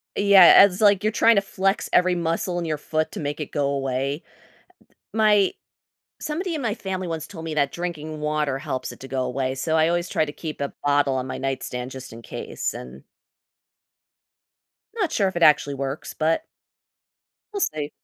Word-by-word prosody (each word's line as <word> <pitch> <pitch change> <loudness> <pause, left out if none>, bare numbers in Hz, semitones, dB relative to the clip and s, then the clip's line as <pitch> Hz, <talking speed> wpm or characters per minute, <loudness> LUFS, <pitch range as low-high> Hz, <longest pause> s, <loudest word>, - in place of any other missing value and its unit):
Yeah, 200 -2 +8
and 200 - +5
it's 180 - -7
like 205 -2 +4
you're 215 - +2
trying 230 +1 +4
to 200 - +4
flex 195 0 -1
every 180 0 +4
muscle 170 +1 -1
in 170 - -3
your 155 -2 -2
foot 155 +1 -2
to - - -6
make 145 0 -4
it 150 - -5
go 145 -1 0
away. 135 +2 -2
Uh, - - -28 0.7
the - - -5
My 210 -3 +4 0.7
Somebody 335 +4 -3
in 295 - -4
my 225 -4 -1
family 190 -4 -4
once 165 -2 -4
told 165 -5 -9
me 160 -1 -4
that 145 -2 +1
drinking 160 -3 -5
water 150 -3 -1
helps 130 -1 -4
it - - -11
to 135 - -9
go 130 0 -1
away, 130 +1 -2
so 160 +4 -1
I 160 0 +4
always 175 0 0
try - - +1
to 145 - -7
keep 155 -1 -7
a 140 - -3
bottle 145 -1 +2
on 130 -1 -2
my - - -5
nightstand 130 -1 -4
just 130 -2 -9
in 115 +1 -10
case, - - -5
and 65 +2 -10 1.9
not 390 -8 -1
sure 200 -9 +2
if 190 - -4
it 170 - +1
actually 145 -2 +4
works, 135 +1 -5
but 160 - 0 1.1
we'll 405 - -3
see. 150 - -1
155 Hz, 200 wpm, -23 LUFS, 140-190 Hz, 1.9 s, Yeah